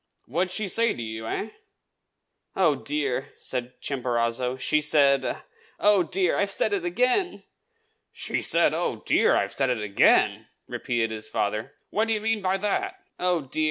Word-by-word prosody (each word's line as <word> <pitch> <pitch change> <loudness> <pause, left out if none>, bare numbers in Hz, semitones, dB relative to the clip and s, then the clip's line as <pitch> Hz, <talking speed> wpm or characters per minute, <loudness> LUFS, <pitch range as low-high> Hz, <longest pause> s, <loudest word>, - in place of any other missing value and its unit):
What 170 +9 0
did 185 - -11
she 215 0 -2
say 230 +5 +2
to - - -7
you, 110 0 -6
eh?" 215 - -3 1.1
"Oh, 175 -6 +4
dear!" 140 -1 -2
said 125 -1 -5
Chimborazo, 125 -1 -1
"she 150 +3 +1
said 145 -1 +2 0.4
oh, 205 -2 +4
dear! 180 +1 +1
I've 200 - +1
said 205 +2 +1
it 195 -4 -1
again!" 250 - 0 0.7
"She - - -3
said, - - +3
'Oh, - - -2
dear! - - +3
I've - - 0
said 135 -2 +1
it 125 -3 0
again!'" 100 -1 +3 0.2
repeated 115 -2 -2
his 110 -1 -6
father. 110 +7 -2 0.2
"What 220 +1 +1
do 225 - +1
you - - -1
mean 220 -1 0
by 190 0 +1
that?" 375 - -1 0.2
"Oh, 180 -2 +1
dear! 135 +2 -4
150 Hz, 165 wpm, -25 LUFS, 125-200 Hz, 1.1 s, Oh